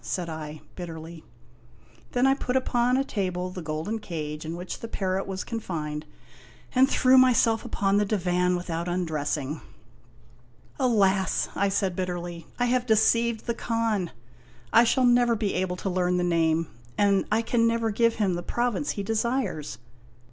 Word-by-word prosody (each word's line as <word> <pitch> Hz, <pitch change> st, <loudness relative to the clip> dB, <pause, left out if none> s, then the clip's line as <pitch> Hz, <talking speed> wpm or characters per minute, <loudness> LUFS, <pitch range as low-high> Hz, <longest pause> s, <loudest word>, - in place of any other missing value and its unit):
" -, -, -28 dB
said 175 Hz, -2 st, -4 dB
I, 155 Hz, -1 st, -7 dB
bitterly. 165 Hz, -2 st, -8 dB, 0.9 s
Then 245 Hz, +1 st, +3 dB
I 270 Hz, -, +5 dB
put 260 Hz, -2 st, -3 dB
upon 250 Hz, -1 st, +2 dB
a 270 Hz, -, +2 dB
table 185 Hz, -7 st, -2 dB
the 180 Hz, -, -6 dB
golden 160 Hz, +8 st, -3 dB
cage 155 Hz, -5 st, -5 dB
in 160 Hz, +2 st, -4 dB
which 180 Hz, +1 st, -6 dB
the 230 Hz, -, -6 dB
parrot 190 Hz, -3 st, -2 dB
was 190 Hz, -1 st, -4 dB
confined, 155 Hz, -9 st, -4 dB, 0.7 s
and 265 Hz, +1 st, +5 dB
threw 260 Hz, -1 st, +5 dB
myself 235 Hz, -3 st, +4 dB
upon 200 Hz, -4 st, +1 dB
the 210 Hz, -, +3 dB
divan 180 Hz, -3 st, +1 dB
without 170 Hz, -1 st, -3 dB
undressing. 155 Hz, -4 st, -2 dB, 0.6 s
" -, -, -29 dB
Alas! 200 Hz, -7 st, +2 dB
" -, -, -20 dB
I 200 Hz, -, +2 dB
said 190 Hz, -2 st, 0 dB
bitterly, 175 Hz, -2 st, -4 dB
" -, -, -26 dB
I 245 Hz, -, +3 dB
have 250 Hz, 0 st, +1 dB
deceived 225 Hz, +1 st, +3 dB
the 235 Hz, -, 0 dB
Khan! 225 Hz, -6 st, -1 dB, 0.6 s
I 230 Hz, +1 st, +7 dB
shall 255 Hz, +2 st, +3 dB
never 240 Hz, -1 st, +4 dB
be 210 Hz, -2 st, -1 dB
able 185 Hz, -1 st, -1 dB
to 180 Hz, -, -5 dB
learn 180 Hz, 0 st, +1 dB
the 180 Hz, -, +1 dB
name 165 Hz, -2 st, +1 dB, 0.3 s
and 200 Hz, -1 st, +3 dB
I 225 Hz, +2 st, +2 dB
can 230 Hz, 0 st, +2 dB
never 230 Hz, -1 st, +1 dB
give 230 Hz, +2 st, +2 dB
him 200 Hz, -4 st, +1 dB
the 175 Hz, -, -2 dB
province 240 Hz, +8 st, -1 dB
he 200 Hz, -, -2 dB
desires. 225 Hz, -, -1 dB
195 Hz, 170 wpm, -26 LUFS, 175-230 Hz, 0.9 s, I